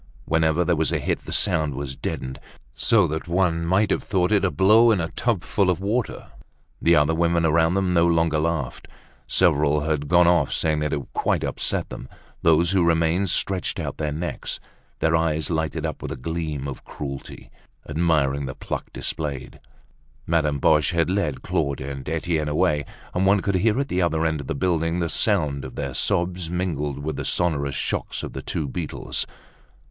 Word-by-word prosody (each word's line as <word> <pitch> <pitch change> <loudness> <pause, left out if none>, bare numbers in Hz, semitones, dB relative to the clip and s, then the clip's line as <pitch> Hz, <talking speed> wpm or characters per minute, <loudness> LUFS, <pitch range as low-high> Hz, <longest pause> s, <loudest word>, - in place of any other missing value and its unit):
Whenever 80 +2 +2
there 90 - +2
was 80 0 +1
a - - +1
hit, - - -1
the - - -10
sound 75 -3 +1
was 70 -1 -5
deadened, 65 0 -5 0.3
so 105 -5 +3
that 80 0 -3
one 85 -1 +1
might 95 +5 +2
have - - +1
thought 90 0 0
it 100 -2 +3
a 95 - +3
blow 110 +6 +5
in 110 -4 +3
a 80 -1 -2
tub 115 -7 -1
full 100 -3 +1
of 90 - +1
water. 105 +4 -2 0.5
The 85 0 +5
other 75 +1 +3
women 85 0 +2
around 80 +2 +3
them 95 -2 +1
no 85 0 +4
longer 80 -2 +2
laughed. 80 -5 -2 0.4
Several 75 -4 +3
had 75 -1 -1
gone 85 +2 +5
off 85 -5 +3
saying 80 -1 +1
that 75 0 -1
it 70 -2 -1
quite - - 0
upset - - -1
them; 65 - -8 0.3
those 85 +1 +4
who 95 -2 +3
remained 85 +3 +2
stretched 95 +1 0
out - - -4
their 75 -1 -2
necks, 80 +4 -4 0.4
their 80 0 +3
eyes 80 0 0
lighted 80 0 -1
up 80 - -4
with - - -5
a - - -3
gleam 75 0 -3
of 70 - -7
cruelty, 70 -2 -8 0.4
admiring 75 -3 +1
the 65 - -6
pluck - - -5
displayed. 75 -4 -4 0.7
Madame 80 -3 +1
Boche 75 +4 +3
had 85 +1 +1
led 85 -9 -1
Claude 70 -1 -1
and 70 +1 -6
Etienne 80 -1 -1
away, 75 -1 +1 0.3
and 95 +1 +1
one 100 +1 +5
could 100 +1 -1
hear 105 +6 +2
at 140 - 0
the 90 -6 0
other 80 -2 +1
end 80 -2 0
of 70 - -10
the - - -2
building 80 +1 0
the 85 -2 -1
sound 75 -11 +1
of 65 - -8
their 70 -2 -3
sobs, 85 +5 -1
mingled 80 -6 -2
with 75 +2 -4
the - - -3
sonorous 70 -6 0
shocks - - -3
of - - -6
the - - -5
two 75 - -3
beetles. 80 +2 -3
80 Hz, 190 wpm, -24 LUFS, 75-90 Hz, 0.7 s, blow